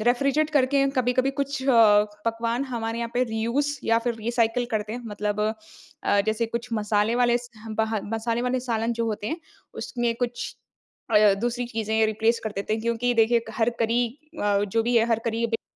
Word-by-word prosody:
Refrigerate 275 +5 +2
करके 275 -1 +3
कभी-कभी 255 +1 +2
कुछ 280 0 -3
अ, 275 - +3 0.6
पकवान 230 +3 0
हमारे 230 -3 -3
यहाँ 235 0 -3
पे 250 - +3
रीयूज़ 235 +5 -1
या 230 0 +3
फ़िर 235 0 -2
रीसाइकल 230 +1 0
करते 215 0 -1
हैं। 245 - -5
मतलब 210 0 -2 0.6
अ, 200 - +3
जैसे 220 +1 0
कुछ 235 +2 -4
मसाले 210 +1 +1
वाले 240 -1 +4
स 240 0 -12 0.3
बह 220 -1 +1
मसाले 230 +1 -1
वाले 250 0 0
सालन 235 -2 -1
जो 230 0 -1
होते 210 -1 -3
हैं 330 +1 -4 0.4
उसमें 240 -1 -1
कुछ 240 0 -3 0.6
अ, 210 -2 +6
दूसरी 240 +1 -1
चीज़ें 220 -1 0
रिप्लेस 225 +2 +1
कर 220 - -2
देते 200 +2 -2
हैं। 220 - -4
क्योंकि 235 +1 0
देखिए 230 +1 +4
क - - -7
हर 230 +1 +3
करी 235 +2 +2 0.4
अ, 205 -1 +2
जो 225 +3 0
भी 240 0 +2
है 230 0 +4
हर 230 -1 +2
करी 230 +1 0
बीत 225 0 -2
230 Hz, 190 wpm, -25 LUFS, 220-245 Hz, 0.6 s, अ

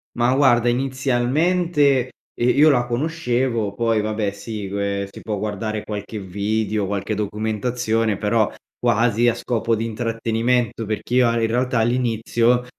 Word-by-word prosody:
Ma, 120 +1 +2
guarda 120 -3 +4
inizialmente, 135 +3 +1 0.2
ehm, 125 +2 +1
io 155 +2 +7
la 120 -3 +2
conoscevo, 125 -6 -1
poi 115 -1 +1
vabbè 105 -1 -1
si 105 0 -6
que 100 0 -2
si - - -11
può 105 -2 -3
guardare 105 +1 -3
qualche 105 +1 -6
video, 105 +2 -1
qualche 100 +1 -2
documentazione, 110 +1 -1
però, 110 +1 +1 0.3
quasi 115 +2 +2
a 120 - +3
scopo 115 -1 -1
di 115 +1 -2
intrattenimento, 115 0 -1
perché 110 +3 -4
io 125 -1 +5
a 115 - 0
in 115 - +1
realtà 125 +2 0
all'inizio, 120 0 +1
115 Hz, 140 wpm, -21 LUFS, 105-125 Hz, 0.3 s, io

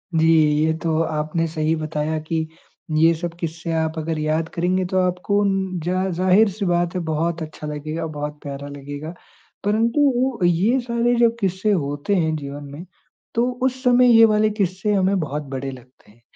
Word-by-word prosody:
जी, 160 0 +3 0.4
ये 160 - +2
तो 160 -1 +1
आपने 155 +1 -1
सही 155 0 0
बताया 155 0 -2
कि 160 -1 -1 0.5
ये 165 +2 +5
सब 170 +1 -5
क़िस्से 165 0 -4
आप 160 0 -1
अगर 160 0 -3
याद 155 +1 0
करेंगे 180 +2 0
तो 190 - +1
आपको 185 +3 +1 0.4
ज़ 175 - -2 0.3
ज़ाहिर-सी 195 +2 +3
बात 175 -1 +1
है - - 0
बहुत 165 +2 -1
अच्छा 155 -1 -7
लगेगा, 155 +2 -4
बहुत 150 -1 -5
प्यारा 140 0 -6
लगेगा। 145 +3 -7 0.5
परंतु 245 +4 +2
ये 190 +9 +3
सारे 240 0 0
जो 235 -1 +6
क़िस्से 190 +1 0
होते 145 +1 -1
हैं 160 -3 +1
जीवन 145 -1 -6
में 155 +6 -9 0.5
तो 235 +2 +2
उस 260 0 0
समय 250 0 +5
ये 225 - +9
वाले 215 0 +3
क़िस्से 200 -1 -1
हमें 195 0 +2
बहुत 150 -2 -3
बड़े 135 0 -4
लगते 125 -3 -16
हैं। 115 +3 -26
165 Hz, 170 wpm, -21 LUFS, 155-200 Hz, 0.5 s, ये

